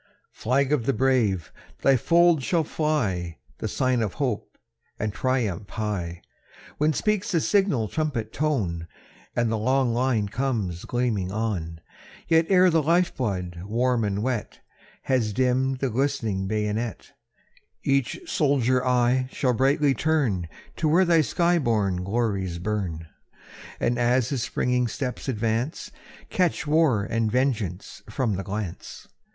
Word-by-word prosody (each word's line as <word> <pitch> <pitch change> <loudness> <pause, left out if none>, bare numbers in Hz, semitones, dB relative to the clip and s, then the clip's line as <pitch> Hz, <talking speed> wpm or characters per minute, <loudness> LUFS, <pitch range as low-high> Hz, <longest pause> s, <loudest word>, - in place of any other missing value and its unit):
III. - - -34 0.2
Flag 135 +4 0
of 120 -6 0
the 135 - +3
brave! 120 -11 +1 0.3
thy 135 - +5
folds 170 +3 +4
shall 170 +2 +1
fly, 110 - -1 0.2
The - - -2
sign 130 -2 +1
of 105 -4 -2
hope 130 -7 -3 0.4
and 105 -1 -2
triumph 110 -8 -1
high, 95 -6 -4 0.6
When 150 +1 +3
speaks 205 +5 0
the 170 - +3
signal 175 - +2
trumpet 135 -6 -2
tone, 100 - -1 0.5
And 120 -1 +1
the 110 - 0
long 130 +1 +2
line 120 -4 +1
comes 105 -7 -2
gleaming 115 -7 -1
on. 95 -7 -3 0.5
Ere 165 0 +5
yet 185 -1 +5
the 165 -1 +3
life 170 +4 +2
blood, 90 -8 -3
warm 120 +2 +1
and 100 0 -1
wet, 125 -4 -3 0.4
Has 120 -5 +1
dimm'd 130 +2 +1
the 135 -3 0
glistening 115 -7 -1
bayonet, 110 +2 -2 0.7
Each 135 -2 +1
soldier 135 - +2
eye 125 0 +2
shall 130 -3 +1
brightly 135 +3 +3
turn 130 - 0 0.3
To 160 - 0
where 180 +5 +4
thy 170 -2 +4
sky 175 +2 +2
born 105 - 0
glories 100 -4 -1
burn; 90 -4 -3 0.7
And 120 +1 0
as 120 0 +2
his 135 -4 -1
springing 125 +1 0
steps 130 +2 -4
advance, 115 +5 -2 0.4
Catch 180 -3 +1
war 150 -8 +3
and 115 0 -1
vengeance 110 -6 -1
from 115 0 -1
the 95 - -4
glance. 100 -2 -6
120 Hz, 140 wpm, -25 LUFS, 105-140 Hz, 0.7 s, thy